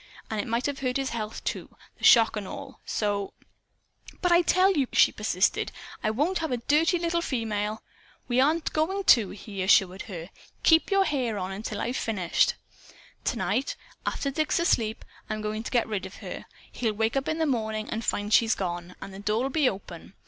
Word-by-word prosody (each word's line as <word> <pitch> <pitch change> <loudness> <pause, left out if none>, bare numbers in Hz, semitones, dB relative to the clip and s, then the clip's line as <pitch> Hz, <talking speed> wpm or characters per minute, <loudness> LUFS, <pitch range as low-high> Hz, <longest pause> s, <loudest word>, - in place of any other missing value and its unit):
And 220 - -1
it - - -8
might 235 +3 -1
have 285 -1 -2
hurt 255 -1 0
his 270 -1 -2
health 220 -2 -5
too - - -4 0.2
the - - -17
shock 230 -1 +7
and 205 -3 -4
all. - - -8
So 205 -2 -1 0.4
" - - -21
"But 360 - +3
I 345 0 +6
tell 370 +3 +4
you," 280 -7 +1
she 230 - +5
persisted, 200 -3 0 0.3
"I 215 - +2
won't 300 +12 0
have 320 -1 -2
a 250 - +1
dirty 305 +8 +2
little 340 0 0
female 220 -6 -2 0.2
" - - -31
"We 245 +1 +3
aren't 310 +4 +1
going 380 +6 0
to," 220 -5 -1
he 200 -1 -7
assured 190 0 +4
her. 175 -3 -8 0.3
"Keep 325 0 +5
your 390 -1 +3
hair 255 - -1
on, 190 +1 -4
till - - -4
I've 245 +2 -2
finished. 190 -6 +1 0.7
Tonight, 235 +3 -1 0.3
after 275 - -2
Dick's 310 +2 0
asleep, 230 -10 +1 0.2
I'm 215 0 -3
going 215 +1 -2
to - - -6
get 240 -3 +1
rid 200 -4 -3
of 190 - -13
her. - - -8 0.2
He'll 225 -3 -1
wake 220 +3 0
up 270 0 0
in 315 - 0
the 320 - +1
morning 220 -5 -1
and 225 +1 -2
find 205 0 -1
she's 225 -2 +5
gone; 175 -1 -4
and 195 - -9
the 195 - -9
door'll 220 +6 0
be 285 -2 +3
open. 185 -1 -9
225 Hz, 200 wpm, -27 LUFS, 205-285 Hz, 0.7 s, shock